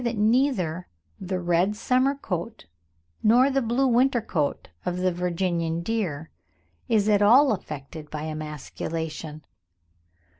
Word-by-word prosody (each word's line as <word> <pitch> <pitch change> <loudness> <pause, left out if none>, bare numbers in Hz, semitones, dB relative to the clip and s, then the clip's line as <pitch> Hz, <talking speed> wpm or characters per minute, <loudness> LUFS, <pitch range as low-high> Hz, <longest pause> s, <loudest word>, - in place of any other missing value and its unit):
that 235 -1 -1
neither 210 - +1 0.3
the 185 0 -3
red 175 +3 +1
summer 255 +5 +1
coat 210 -4 -5 0.6
nor 245 +5 +5
the 270 0 +1
blue 240 +3 +1
winter 255 0 +3
coat 155 -10 -2 0.2
of 180 0 -2
the 185 0 +1
Virginian 170 -1 -1
deer 170 -8 -3 0.6
is 215 -2 +3
at 205 -1 +4
all 250 +7 +6
affected 150 -5 -6
by 150 -1 -5
emasculation. 155 0 -5
185 Hz, 120 wpm, -25 LUFS, 165-235 Hz, 0.6 s, all